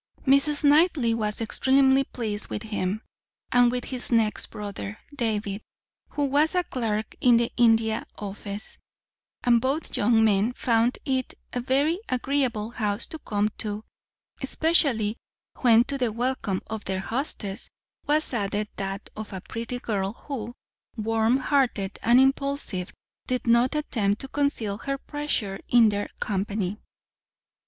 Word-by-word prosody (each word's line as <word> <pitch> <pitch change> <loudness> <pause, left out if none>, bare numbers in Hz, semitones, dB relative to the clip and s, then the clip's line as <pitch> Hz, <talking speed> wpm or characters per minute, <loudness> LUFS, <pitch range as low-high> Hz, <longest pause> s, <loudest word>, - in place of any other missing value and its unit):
Mrs. 280 +2 +3
Knightley 290 -5 +4
was 215 -1 -1
extremely 265 +3 +3
pleased 215 -5 -4
with 210 - -5
him, 210 -1 -2 0.5
and 245 -1 +5
with 250 0 -2
his 255 -2 -4
next 225 -2 +2
brother, 205 -1 -6 0.2
David, 215 -4 -1 0.5
who 290 - -1
was 295 +5 +2
a 360 - +3
clerk 220 -7 -2
in 245 -2 +6
the 235 0 +1
India 225 -2 +3
Office, 205 +1 -6 0.6
and 235 -1 +4
both 275 +5 -1
young 225 +1 +4
men 210 +3 +2
found 235 0 +1
it 260 -2 -1 0.2
a 245 - -1
very 280 +7 +2
agreeable 250 -4 0
house 210 -2 +1
to 320 - -7
come 210 -5 0
to, 210 0 -3 0.6
especially 270 -7 +2 0.4
when 235 -2 +6
to 275 +2 -4
the 245 -3 +1
welcome 230 -4 -2
of 220 -1 -5
their 190 0 -2
hostess 220 -4 -3 0.4
was 300 -1 +2
added 210 -1 -1
that 195 0 -4
of 215 -1 -7
a 190 -2 -6
pretty 230 +5 -5
girl 200 -4 -2
who, 240 -3 -6 0.4
warm 225 +2 +2
hearted 255 -8 0
and 240 +2 +5
impulsive, 270 -8 0 0.4
did 250 -1 -1
not 235 +3 +3
attempt 215 -9 0
to 270 - -6
conceal 250 -8 -1
her 275 +2 -2
pleasure 270 -10 -3
in 235 -3 +6
their 205 0 -2
company. 200 0 -2
230 Hz, 140 wpm, -26 LUFS, 210-265 Hz, 0.6 s, in